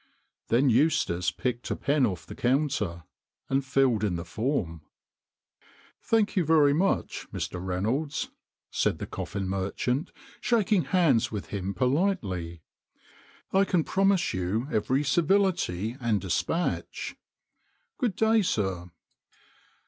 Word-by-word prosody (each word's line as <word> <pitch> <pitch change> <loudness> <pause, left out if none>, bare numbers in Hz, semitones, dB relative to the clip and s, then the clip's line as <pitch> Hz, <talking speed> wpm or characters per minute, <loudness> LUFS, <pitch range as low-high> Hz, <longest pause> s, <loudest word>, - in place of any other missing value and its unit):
Then 125 +3 +3
Eustace 110 - +2
picked 120 +7 -3
a - - 0
pen 140 -3 +2
off 90 -5 -5
the - - -9
counter 125 - 0 0.5
and 135 +1 +1
filled 130 -4 +2
in 100 -4 +1
the 85 0 -5
form. 100 - -2 0.6
" - - -30
Thank 220 -2 +2
you 185 - +3
very 150 -2 +5
much, 185 +6 0
Mr. 90 0 -4
Reynolds," 115 - -2 0.4
said - - +1
the - - -5
coffin 100 -1 -4
merchant, 100 - -1 0.3
shaking 215 -5 +2
hands 165 - +3
with 105 -3 -5
him 100 -1 -3
politely. 100 - -1 0.4
" - - -26
I 195 +1 +5
can 180 -4 +1
promise 195 0 +2
you 95 +7 -1
every 130 +6 +1
civility 150 - +1
and 115 -4 +1
despatch. 160 - -2 0.8
Good 240 - 0
day, 220 0 +3
sir." 95 - -1
130 Hz, 125 wpm, -27 LUFS, -, 0.8 s, very